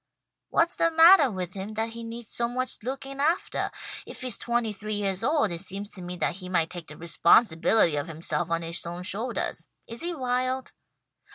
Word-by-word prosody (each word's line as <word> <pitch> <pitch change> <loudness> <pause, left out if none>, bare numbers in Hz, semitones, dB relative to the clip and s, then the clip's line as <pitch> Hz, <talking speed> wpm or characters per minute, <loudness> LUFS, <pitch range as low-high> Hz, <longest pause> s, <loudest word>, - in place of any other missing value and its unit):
"What's 335 +1 +2
the 335 - +3
mattah 325 -2 +7
with 180 -2 -4
him, 200 +2 -6
that 225 +1 -1
he 230 +1 -8
needs 230 0 -7
so 235 - 0
much 255 +1 -2
looking 270 +3 -5
aftah? 325 +6 0 0.3
If - - -10
he's 250 -5 -1
twenty 235 -2 0
three 215 +1 -4
yeahs 195 -1 -1
old 285 - +2
it 170 - -2
seems 200 +2 -3
to 185 - -8
me 180 0 -6
that 170 - 0
he 185 -2 -7
might 165 -3 +1
take 175 -3 -7
the 150 - -11
responsibility 170 +1 +4
of 145 - -2
himself 165 +1 -1
on 165 0 0
his 165 +1 -3
own 175 +1 -6
shouldahs. 225 +6 -3 0.2
Is 230 +1 -8
he 345 0 -3
wild?" 255 -1 -1
215 Hz, 195 wpm, -27 LUFS, 175-255 Hz, 0.3 s, mattah